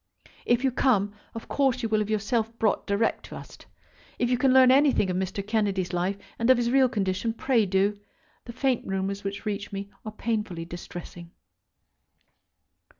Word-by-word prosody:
If 240 +2 +2
you 265 - +2
come, 210 -6 +2 0.2
of 230 - -7
course 265 -3 +1
you 225 - -1
will 215 0 +2
have 210 0 -2
yourself 220 +2 -1
brought 215 -3 0
direct 200 +3 0
to - - -10
us. - - -10 0.6
If 240 0 0
you 250 - +3
can 265 0 +4
learn 260 -1 +7
anything 270 -8 +3
of - - -2
Mr. 190 +1 -3
Kennedy's 200 -4 -1
life, 180 +3 -1 0.2
and 230 +2 +1
of 260 - +7
his 240 0 0
real 265 -1 +4
condition, 200 0 -1
pray 230 -3 +1
do. 200 +2 +1 0.5
The 235 - -8
faint 255 0 0
rumours 195 +1 -2
which 200 +2 -5
reach 205 -1 -3
me 200 0 -6
are 215 - -6
painfully 210 -6 -3
distressing. 175 0 -9
215 Hz, 175 wpm, -26 LUFS, 195-240 Hz, 0.6 s, learn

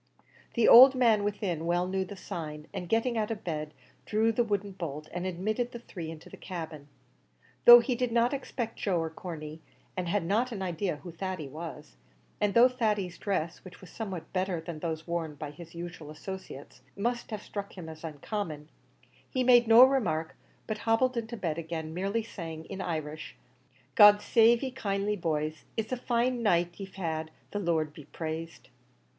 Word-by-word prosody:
The 235 -2 +4
old 260 +3 +10
man 230 -5 +4
within 195 -6 -2
well 175 +1 +1
knew 190 0 0
the 195 +2 -8
sign, 155 -5 -6
and, 175 - -5
getting 230 +1 +1
out 215 - -1
of 220 -2 -4
bed, 155 -3 -3 0.4
drew 220 +1 +2
the 240 +2 +2
wooden 205 -2 -2
bolt, 155 -5 -6
and 180 +1 -3
admitted 215 +7 -2
the - - -5
three 175 -8 -7
into 160 -1 -10
the - - -11
cabin. 160 -5 -7 0.8
Though 240 0 +12
he 250 +2 -1
did 245 0 -1
not 235 +3 +3
expect 245 -4 -4
Joe 190 -4 +1
or 165 -1 -2
Corney, 160 -2 -7 0.3
and 180 -1 -2
had 190 -1 0
not 225 +8 +1
an 200 -4 -4
idea 175 -1 -1
who 160 +4 -10
Thady 180 -2 -4
was; 155 +1 -9 0.4
and 205 -1 +1
though 235 +2 +8
Thady's 210 -8 -1
dress, 180 -5 -2
which 185 -1 -12
was 185 - -13
somewhat 195 -7 -6
better 185 -2 0
than 165 -1 -7
those 160 -1 -3
worn 170 -3 -3
by 145 0 -6
his 165 +2 -12
usual 170 -3 -7
associates, 155 -2 -9 0.2
must 235 +4 -2
have 215 -2 -5
struck 200 -1 -6
him 170 -3 -7
as 160 0 -10
uncommon, 155 0 -5 0.6
he 255 -2 0
made 240 -2 +6
no 230 +2 +9
remark, 180 -13 +2 0.3
but 215 -1 -4
hobbled 240 +4 +2
into 235 0 -4
bed 170 -5 -2
again, 160 -1 -5
merely 200 +6 -1
saying, 165 -7 -7
in 195 -1 -6
Irish, 155 -3 -4 0.6
"God 205 -3 +8
save 230 +3 +4
ye 265 - -2
kindly, 205 -4 -1
boys! 155 -4 -2
it's 225 +1 -2
a - - +1
fine 245 0 0
night 175 -5 +1
ye've 190 -1 -8
had, 160 -4 -3 0.2
the 205 - -2
Lord 160 -5 0
be 150 -2 -12
praised!" 160 0 -6
185 Hz, 185 wpm, -29 LUFS, 160-225 Hz, 0.8 s, Though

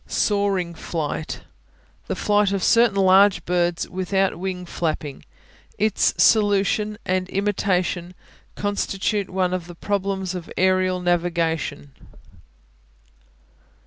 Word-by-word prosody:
Soaring 200 -4 0
Flight 160 -2 -4 0.7
The - - -2
flight 205 -1 +2
of 195 -2 -1
certain 230 -3 +4
large 195 +1 +5
birds 175 -1 0
without 190 0 -1
wing 185 -1 -4
flapping. 155 -4 -4 0.5
Its 215 0 +2
solution 205 +2 +3
and 185 0 -1
imitation 185 -3 -1 0.4
constitute 205 0 -1
one 185 -1 0
of 180 -2 -3
the 175 - -10
problems 195 -1 -2
of 180 -2 -7
aerial 185 0 +2
navigation. 170 -5 -1
185 Hz, 100 wpm, -22 LUFS, 175-200 Hz, 0.7 s, large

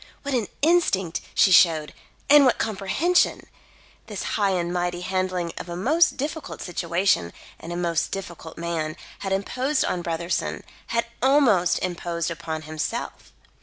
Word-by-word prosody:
What 280 -1 -3
an 235 -6 0 0.2
instinct 250 - +2
she 190 - +5
showed 160 -4 +5 0.3
and 290 0 +8
what 255 - +4
comprehension! 220 - +1 0.6
This - - -5
high 205 -2 +2
and 175 -2 -1
mighty 175 0 -1
handling 185 -2 -2
of - - -7
a 170 - -4
most 310 - +3
difficult 305 +3 -4
situation 170 - 0 0.3
and 165 - -8
a 175 - -3
most 170 -2 0
difficult 170 -4 -7
man, 165 -1 -3 0.2
had 195 - -4
imposed 255 +9 0
on 180 - -1
Brotherson, 170 +1 -2 0.2
had 235 0 0 0.2
almost 250 -10 +4
imposed 170 -1 -2
upon 160 -1 -5
himself. 155 0 -5
180 Hz, 140 wpm, -24 LUFS, 170-235 Hz, 0.6 s, and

